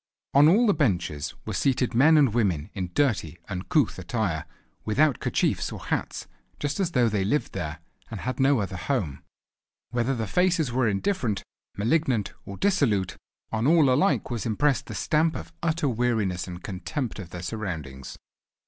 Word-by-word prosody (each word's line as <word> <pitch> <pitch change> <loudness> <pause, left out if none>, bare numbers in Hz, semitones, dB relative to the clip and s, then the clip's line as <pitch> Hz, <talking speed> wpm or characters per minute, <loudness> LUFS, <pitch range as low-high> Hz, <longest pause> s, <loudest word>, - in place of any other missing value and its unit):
On 145 +2 +7
all 215 +8 +5
the 205 - +4
benches 85 - -1
were - - -4
seated 125 -2 +1
men 150 +7 +6
and 135 -7 +4
women 95 -8 0
in 90 -3 -3
dirty, 105 - +1
uncouth 95 - 0
attire, 100 - -2 0.4
without 140 +5 +2
kerchiefs - - 0
or - - -6
hats, - - -3 0.3
just 145 +3 -2
as 180 -3 0
though 125 -3 +4
they 105 -3 0
lived 145 +10 0
there 80 -4 -4 0.3
and - - -6
had 130 +1 -3
no 135 -3 +4
other 95 -2 -4
home. 90 - -2 0.7
Whether 120 +2 0
the 115 -2 -2
faces 170 - +2
were 125 -1 +2
indifferent, 110 - -1 0.3
malignant, 120 - +1
or 100 - -7
dissolute, 130 - +1 0.4
on 110 +3 0
all 155 -5 +5
alike 165 -1 +2
was 115 -5 -2
impressed 135 +4 +1
the - - -6
stamp 160 +1 +1
of - - -7
utter 165 -2 0
weariness 110 -8 0
and 90 -1 -8
contempt 110 +5 -4
of 90 -3 -8
their 90 0 -7
surroundings. 80 - -5
120 Hz, 165 wpm, -26 LUFS, 95-145 Hz, 0.7 s, On